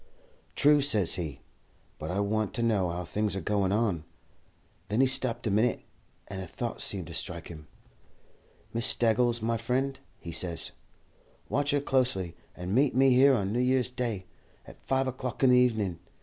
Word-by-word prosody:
"'True,' 145 0 +5
says 110 -11 +4
he, 80 -6 -4 0.6
'but 80 - -5
I 90 - -1
want 105 0 -1
to 115 - -1
know 105 -6 +1
how 90 +1 -4
things 105 +2 -1
are - - -2
goin' 100 +1 0
on.' 100 -7 0 0.8
Then 105 +4 -1
he 135 - +6
stopped 130 -3 0
a 110 - 0
minit, 110 +4 +1 0.4
and 95 -1 -6
a 95 - -7
thought 120 +6 -5
seemed 95 -4 +1
to 85 - -9
strike 85 0 -5
him. 75 -3 -10 1.1
'Miss 115 0 +2
Staggles, 120 0 +1
my 115 0 0
friend,' 130 +4 -1 0.2
he 85 - -8
says, 85 0 -2 0.8
'watch 145 +1 0
her 145 - +3
closely, 125 -11 0 0.2
and 90 +2 -4
meet 135 +3 +3
me 135 0 +5
here 135 +2 +6
on 100 -3 -1
New 120 - 0
Year's 125 0 +2
Day, 120 -7 -3 0.4
at - - -14
five 135 0 +1
o'clock 130 -1 -4
in 130 - +6
the 125 - +6
evening. 110 -9 +1
110 Hz, 180 wpm, -28 LUFS, 95-125 Hz, 1.1 s, he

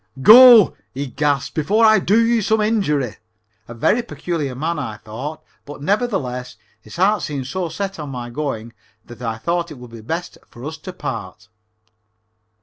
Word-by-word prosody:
"Go," 235 - +9 0.2
he 140 +2 -3
gasped, 140 +2 -1
"before 205 +9 +2
I 220 -2 +6
do 200 +3 +2
you 230 -1 +2
some 220 +2 +1
injury." 190 - 0 0.5
A 120 - -9
very 210 - +2
peculiar 165 - -4
man, 160 +4 -2
I 110 -6 -5
thought, 115 +9 -8 0.2
but, 145 0 -10
nevertheless, 155 - -2 0.3
his 110 - -13
heart 200 +4 +2
seemed 140 -4 -4
so 180 +4 -3
set 195 +1 -5
on 150 -2 -6
my 120 -2 -6
going 120 -5 -4 0.3
that 120 -1 -13
I 115 -2 -3
thought 170 +6 -2
it 150 - -10
would 125 -1 -12
be 115 -1 -10
best 165 +10 -5
for 120 +3 -11
us 160 +1 -6
to 185 +4 -8
part. 105 - -7
150 Hz, 170 wpm, -20 LUFS, 125-195 Hz, 0.5 s, Go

